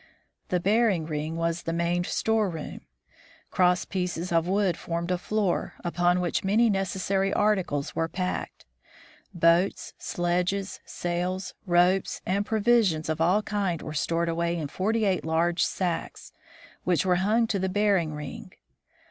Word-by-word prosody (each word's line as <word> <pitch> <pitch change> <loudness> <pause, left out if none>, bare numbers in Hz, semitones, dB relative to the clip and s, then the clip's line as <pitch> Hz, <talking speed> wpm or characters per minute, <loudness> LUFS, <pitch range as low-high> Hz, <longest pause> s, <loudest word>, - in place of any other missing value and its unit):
The 180 - +1
bearing 200 -3 +2
ring 155 +1 -3
was 165 0 -1
the 165 - -3
main 170 +1 0
storeroom. 205 -9 -1 0.7
Crosspieces 180 -1 0
of 165 0 +2
wood 190 -2 +2
formed 170 +1 -3
a 180 - +2
floor, 205 -1 -1
upon 175 +1 +2
which 180 -1 -1
many 215 +4 +3
necessary 195 0 0
arti 210 -1 +3
cles 145 -5 -4
were 165 - 0
packed. 180 +2 -4 0.7
Boats, 170 +2 +2
sledges, 180 +3 -1
sails, 180 +2 -3
ropes, 180 +2 +3
and 200 +2 0
provi 230 +2 +4
sions 160 -7 -1
of 160 +1 -1
all 185 +6 +3
kinds 195 -6 -2
were 155 - -6
stored 165 +2 0
away 170 +1 0
in 150 -4 -4
forty 215 +6 0
eight 190 -3 +1
large 165 +2 +1
sacks, 175 -3 -3 0.5
which 180 0 +1
were 180 -1 +3
hung 215 +5 +2
to 210 -3 -1
the 190 0 0
bearing 190 -6 +1
ring. 150 -2 -8
180 Hz, 145 wpm, -27 LUFS, 170-195 Hz, 0.7 s, provi